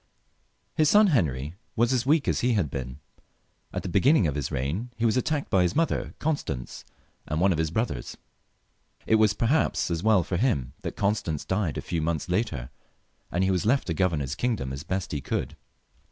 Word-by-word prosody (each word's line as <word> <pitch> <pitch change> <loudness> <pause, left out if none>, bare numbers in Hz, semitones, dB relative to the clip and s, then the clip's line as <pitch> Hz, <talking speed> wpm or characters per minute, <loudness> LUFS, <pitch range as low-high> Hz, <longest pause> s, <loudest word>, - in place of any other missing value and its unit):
His 155 -1 +4
son 210 0 +6
Henry 75 - 0 0.2
was 120 +3 +2
as 125 0 0
weak 150 0 +3
as - - +1
he 125 0 +2
had 90 - 0
been. 65 -1 -5 0.7
At - - -4
the - - -4
beginning 105 - +4
of 75 - 0
his 70 -3 -2
reign 80 - -2
he 115 - 0
was 110 - +3
attacked 145 +2 -1
by 95 -4 +4
his 90 -1 +1
mother, 165 +1 0
Constance, 140 - -3 0.4
and 75 - -1
one 95 +3 +4
of 80 - 0
his 80 -1 +1
brothers. 85 - -3 0.9
It 110 - +4
was, 105 -2 +3
perhaps, 120 - +1
as 85 -1 -1
well 105 -3 +4
for 90 +1 -2
him 70 - 0
that - - -5
Constance 100 -7 -1
died 95 -7 -1
a - - -2
few 85 -2 -2
months 80 +1 -2
later» 80 - -1 0.6
and 90 +3 +1
he 95 - +2
was 90 -2 +1
left 130 +6 +2
to 85 - -1
govern 85 -4 +1
his 70 0 -3
kingdom 100 - -2
as 70 - -5
best 95 +4 -3
he 75 - -2
could. - - -3
95 Hz, 200 wpm, -26 LUFS, 75-120 Hz, 0.9 s, son